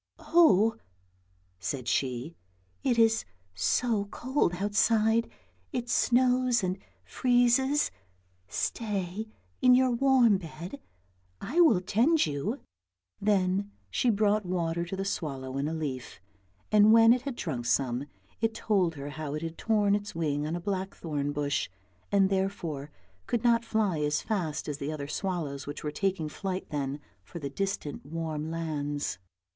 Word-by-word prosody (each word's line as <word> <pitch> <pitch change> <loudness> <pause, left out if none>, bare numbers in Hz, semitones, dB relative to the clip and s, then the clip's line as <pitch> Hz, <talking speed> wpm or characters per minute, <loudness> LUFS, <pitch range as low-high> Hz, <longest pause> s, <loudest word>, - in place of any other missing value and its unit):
" - - -53
Oh! 225 - +4 0.4
" 90 0 -39
said 120 +7 -4
she, 130 +6 -1 0.2
" 90 -1 -39
it 250 -3 +2
is 225 -1 +4 0.3
so 205 - +1
cold 245 -3 0
outside, 220 +3 +2 0.4
it 245 -4 -3
snows 250 -2 +3
and 185 +1 -1 0.3
freezes, 255 +3 +2 0.6
stay 205 - -2 0.3
in 250 0 +7
your 255 0 +4
warm 240 -5 +4
bed, 175 - -8 0.6
I 310 +8 -2
will 230 - +5
tend 255 - +3
you." 150 - -3 0.6
Then 200 0 +1 0.2
she 250 - +2
brought 210 -1 +2
water 170 -2 -1
to 180 - -5
the 195 0 -3
swallow 135 -9 -4
in 140 - 0
a 160 - -2
leaf, 135 - -5 0.5
and 210 0 +6
when 225 +1 +8
it 250 - -1
had 270 -1 -5
drunk 120 - -4
some, 125 +2 0 0.3
it 225 -1 0
told 185 -8 +1
her 140 0 -6
how 150 -1 -5
it 155 - -4
had 165 0 -4
torn 210 -1 +2
its 205 -2 -2
wing 150 -3 -1
on 160 - -2
a - - -3
blackthorn 170 -6 -3
bush, 145 -1 -1 0.4
and 195 -1 +4
therefore 175 -7 -2 0.4
could 240 -1 -1
not 235 -1 +4
fly 215 -7 0
as 150 0 0
fast 180 -9 -2
as 150 -1 -4
the 140 +2 -3
other 145 -2 -5
swallows 150 -5 -3
which 145 - -6
were 150 - -2
taking 185 -1 -1
flight 185 +4 -4
then 140 -1 -2 0.2
for - - -10
the 140 -4 -5
distant 195 -4 -3
warm 155 +1 -4
lands. 145 - -3
185 Hz, 150 wpm, -29 LUFS, 150-225 Hz, 0.6 s, when